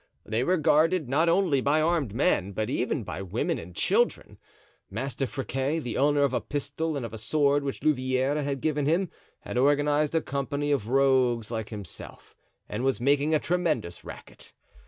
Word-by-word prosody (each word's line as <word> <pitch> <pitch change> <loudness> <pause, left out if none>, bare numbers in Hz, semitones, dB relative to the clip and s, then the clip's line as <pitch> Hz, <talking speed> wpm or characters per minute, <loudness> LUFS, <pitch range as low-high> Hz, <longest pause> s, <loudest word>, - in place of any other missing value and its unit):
They 110 +3 0
were 185 +6 +2
guarded, 160 +1 +3
not 155 +6 +2
only 170 -6 +2
by 145 +4 +2
armed 155 -7 +1
men, 100 - +1
but 110 +2 -2
even - - -1
by - - -6
women 95 -2 -2
and 85 +1 -11
children. - - 0 0.5
Master 130 +5 -3
Friquet, 135 +2 -2
the 125 -7 -4
owner 145 +1 +3
of 140 -2 +1
a - - 0
pistol 145 +2 -3
and 130 - -3
of 115 - -8
a 110 - -6
sword 145 +4 +2
which 135 -1 -4
Louvieres 130 0 +1
had 140 -2 -3
given 150 -2 0
him, 170 +2 +1 0.3
had 125 - -3
organized 145 +2 +2
a 165 - +3
company 140 +1 -2
of 135 -7 0
rogues 130 -3 +2
like 110 -2 -3
himself 105 -5 -8 0.3
and 120 - -4
was 135 -1 +1
making 145 +4 +2
a - - +3
tremendous 165 - -1
racket. - - -12
140 Hz, 175 wpm, -27 LUFS, 125-150 Hz, 0.5 s, guarded